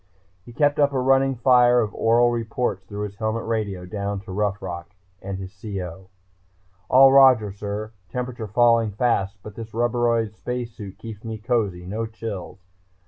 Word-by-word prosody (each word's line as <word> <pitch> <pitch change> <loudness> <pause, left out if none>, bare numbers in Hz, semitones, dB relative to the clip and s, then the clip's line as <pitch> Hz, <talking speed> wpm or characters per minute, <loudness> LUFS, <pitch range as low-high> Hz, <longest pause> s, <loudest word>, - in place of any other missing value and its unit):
He 120 - -12
kept 145 +4 +1
up 140 -1 +3
a 130 - +1
running 135 +1 +3
fire 125 0 +5
of 110 -3 -1
oral 120 +1 +3
reports 115 -3 -2
through 105 +2 -5
his 100 -1 -6
helmet 110 +1 -2
radio, 105 -5 -2
down 100 +1 -3
to 100 - -10
Rough 100 +1 -1
Rock 85 +1 -7 0.3
and 100 0 -5
his 95 +1 -8
CO. 95 -3 -6 0.8
"All 135 +1 +7
Roger, 130 -7 +6
sir... 105 +2 -5 0.2
temperature 125 +1 -4
falling 115 0 +3
fast 100 -3 0
but 105 - -9
this 110 +1 -9
rubberoid 120 -2 +1
space 125 +1 -4
suit 105 -4 -10
keeps 110 -2 -9
me 110 -1 -5
cozy, 105 -6 -1
no 110 +5 -3
chills... 110 -5 -7
110 Hz, 165 wpm, -23 LUFS, 100-120 Hz, 0.8 s, All